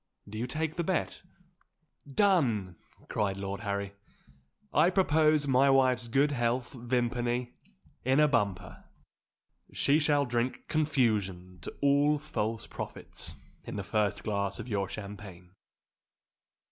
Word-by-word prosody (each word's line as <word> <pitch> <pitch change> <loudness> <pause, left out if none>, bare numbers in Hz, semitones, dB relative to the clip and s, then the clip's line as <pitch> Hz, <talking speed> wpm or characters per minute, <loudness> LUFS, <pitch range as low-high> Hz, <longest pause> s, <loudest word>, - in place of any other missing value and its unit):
Do 110 +2 -7
you 120 - -2
take 155 +4 -3
the 170 - 0
bet?" 185 +1 -1 0.9
"Done!" 130 - +2 0.3
cried 100 -2 -1
Lord 100 0 -4
Harry. 100 -2 -3 0.8
"I 175 - +5
propose 155 -5 +3
my 135 +1 +4
wife's 130 -2 +3
good 140 +5 +2
health, 120 0 -1
Vimpany, 120 0 -1 0.5
in 130 +3 +3
a 150 - +6
bumper. 100 - -1 0.9
She 145 +2 +2
shall 145 -2 +2
drink 120 0 -2
confusion 105 - 0
to - - -7
all 145 +1 +4
false 115 -7 -3
prophets - - -4 0.3
in - - -7
the 100 - -3
first 105 0 0
glass 100 -2 -2
of - - -6
your 100 -4 -1
champagne!" 100 -3 -9
120 Hz, 120 wpm, -30 LUFS, 100-145 Hz, 0.9 s, a